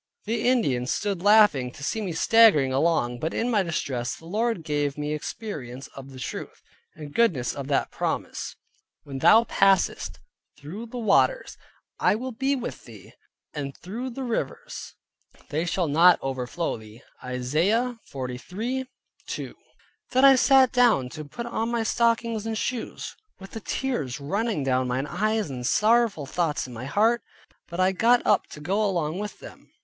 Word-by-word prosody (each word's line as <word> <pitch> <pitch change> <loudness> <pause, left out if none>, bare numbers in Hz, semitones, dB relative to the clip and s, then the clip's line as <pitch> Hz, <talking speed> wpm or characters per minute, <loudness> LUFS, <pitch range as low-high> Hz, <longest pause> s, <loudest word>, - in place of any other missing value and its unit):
The 225 +2 -1
Indians 135 - +1
stood 200 -4 -1
laughing 205 -11 +5
to 145 - -11
see 220 +9 -1
me 195 -4 -3
staggering 165 -7 +5
along; 135 -5 +1
but 160 +6 -3
in 240 +2 0
my 210 -3 +3
distress 130 -8 -2
the 165 - -16
Lord 215 0 -1
gave 145 -2 -1
me 150 0 -2
experience 145 - -6
of 135 0 -10
the 135 - -11
truth, - - -7 0.3
and 150 -2 -9
goodness 165 - +2
of 140 -1 -6
that 140 -1 0
promise, - - -3 0.5
"When 135 -2 -6
thou 220 - +7
passest 195 -5 +2 0.4
through 190 +11 -8
the 245 - -8
waters, 240 - +2 0.4
I - - +3
will 255 +4 -4
be 270 +4 0
with 245 -2 -6
thee; - - -13 0.4
and 140 -2 -5
through 230 +9 -5
the 265 +2 -6
rivers, 365 - -4 0.5
they 155 +3 -1
shall 175 0 0
not 170 +4 +6
overflow 135 +5 -2
thee" 110 +2 -14 0.2
(Isaiah 165 - 0
43.2). 205 - -6 0.6
Then 260 +2 +4
I 275 - +9
sat 265 -1 +5
down 240 - +3
to 155 +4 -8
put 235 +11 -7
on 230 -1 -2
my 235 -1 0
stockings 230 -1 +1
and 220 -1 -2
shoes, 245 +2 -4 0.2
with 195 0 -11
the 225 - -6
tears 200 - -3
running 195 +3 -1
down 130 -1 +1
mine 125 +3 -1
eyes, 215 +1 -1
and 125 -2 -5
sorrowful 215 - +2
thoughts 160 +1 -1
in 125 - -9
my 120 +2 -7
heart, 220 - +2 0.5
but 170 +1 -7
I 185 +1 +4
got 235 +6 +3
up 210 - +3
to - - -11
go 190 +8 0
along 175 -4 -1
with 210 0 -5
them. - - -13
185 Hz, 165 wpm, -25 LUFS, 140-230 Hz, 0.6 s, I